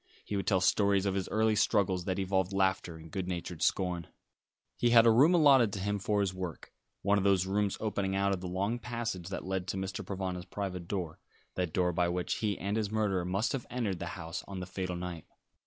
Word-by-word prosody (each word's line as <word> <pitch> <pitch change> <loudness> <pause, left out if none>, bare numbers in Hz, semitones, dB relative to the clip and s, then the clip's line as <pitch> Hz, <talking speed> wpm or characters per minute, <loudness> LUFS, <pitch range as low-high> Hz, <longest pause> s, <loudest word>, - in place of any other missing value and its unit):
He 105 - -3
would 100 - -2
tell 95 -3 +3
stories 100 +1 +3
of 100 - +1
his 95 -1 -2
early 110 0 +2
struggles 95 -4 +2
that 95 0 -1
evolved 95 0 0
laughter 95 -3 0
and 80 0 -12
good 95 -2 -3
natured 90 -2 -4
scorn. 90 -4 0 0.7
He 120 - +2
had 115 -1 +7
a 115 - +7
room 145 +10 +6
allotted 135 -9 +6
to 100 - -3
him 100 +1 -1
for 105 +1 +1
his 95 -2 0
work, 90 -3 -6 0.3
one 100 +1 +3
of - - -1
those 95 -2 +3
rooms 100 +1 0
opening 100 -3 -1
out 100 0 +2
of 90 - -3
the 90 - -4
long 100 +6 -1
passage 115 -7 -4
that 95 - -5
led 95 -1 -2
to 95 - -2
Mr. 95 0 -4
Provana's 95 -2 -4
private 90 -2 -5
door, 90 -5 -3 0.3
that 90 -3 -2
door 90 +1 +1
by 85 +1 +1
which 90 0 -1
he 105 -3 -1
and 100 +3 -2
his 105 -2 -1
murderer 100 -4 0
must 100 +6 0
have 135 -3 -3
entered 110 -8 -2
the - - -4
house 85 -2 -5
on 100 -1 -6
the 90 - -4
fatal 90 0 -4
night. 85 -2 -6
95 Hz, 225 wpm, -31 LUFS, 90-105 Hz, 0.7 s, had